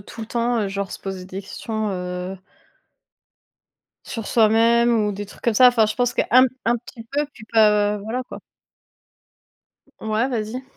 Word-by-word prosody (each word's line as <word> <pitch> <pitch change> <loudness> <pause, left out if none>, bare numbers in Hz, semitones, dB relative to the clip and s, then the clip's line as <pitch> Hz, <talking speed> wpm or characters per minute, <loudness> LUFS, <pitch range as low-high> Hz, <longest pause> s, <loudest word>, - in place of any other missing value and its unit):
tout 210 +3 -11
le 220 - -5
temps, 235 0 0
heu, 205 - -1
genre 195 0 -4
se - - -7
poser 190 -2 -6
des 190 +1 -7
questions, 220 +2 -4
heu 180 0 -5 1.7
sur 225 -3 -5
soi-même 230 +1 +4 0.2
ou 205 - -1
des 205 +1 -5
trucs 200 - -15
comme 235 - 0
ça. 250 +4 +7
Enfin, 230 -3 +3
je 215 - -3
pense 245 -1 0
qu'un - - 0 0.2
p 255 - -9
un 235 +1 +3
petit 230 0 -12
peu, 290 +2 0
puis 215 - -13
pas 210 -2 +4
voilà 220 +5 -4
quoi. - - -9 1.6
Ouais, 220 +4 0
vas-y. 235 +1 -3
220 Hz, 175 wpm, -22 LUFS, 205-235 Hz, 1.7 s, ça